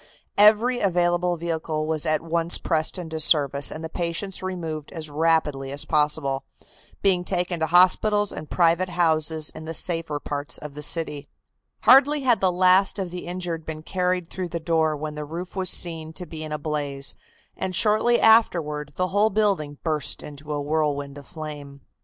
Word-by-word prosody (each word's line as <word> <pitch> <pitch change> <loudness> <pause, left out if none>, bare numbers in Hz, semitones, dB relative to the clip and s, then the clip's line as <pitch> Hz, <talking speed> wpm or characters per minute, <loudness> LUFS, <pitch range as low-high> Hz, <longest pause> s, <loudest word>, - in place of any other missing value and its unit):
Every 220 +4 +5
available 175 -1 +1
vehicle 160 -2 -3
was 160 0 -1
at 155 0 +1
once 165 +1 +2
pressed 160 +1 -1
into 160 -3 -5
service 145 -3 +4
and 160 - -7
the - - -3
patients 170 +3 -3
removed 165 -5 -5
as 155 -3 -6
rapidly 150 -3 0
as 140 +1 -3
possible, 150 -3 +1 0.6
being 185 -3 +3
taken 180 -1 -2
to 160 - 0
hospitals 200 +4 +4
and 155 - -8
private 170 +1 +2
houses 160 -2 +1
in 155 - -10
the 165 +1 -4
safer 165 -4 -2
parts 145 0 -4
of 150 -1 -9
the 150 - -8
city. 150 -2 0 0.5
Hardly 280 +3 +5
had 250 -4 +2
the 190 -1 +3
last 185 +3 +3
of 190 -3 -4
the 180 -1 -7
injured 175 -2 -4
been 155 0 -7
carried 180 -1 -1
through 185 0 -5
the 170 0 -4
door 160 -2 0
when 150 +1 -5
the 150 0 -6
roof 170 +5 -7
was 190 -1 -1
seen 160 -2 +1
to 180 - -8
be 160 -2 -8
in 155 - -7
a 150 - -2
blaze, 145 -2 -4 0.4
and 185 -1 -4
shortly 220 +4 +3
afterward 155 -10 +3
the 185 0 -1
whole 205 +3 +2
building 190 -9 0
burst 155 -4 -1
into 145 +1 -9
a 145 - -2
whirlwind 145 -1 -2
of 140 - -15
flame. 145 -3 -9
165 Hz, 175 wpm, -24 LUFS, 150-180 Hz, 0.6 s, Every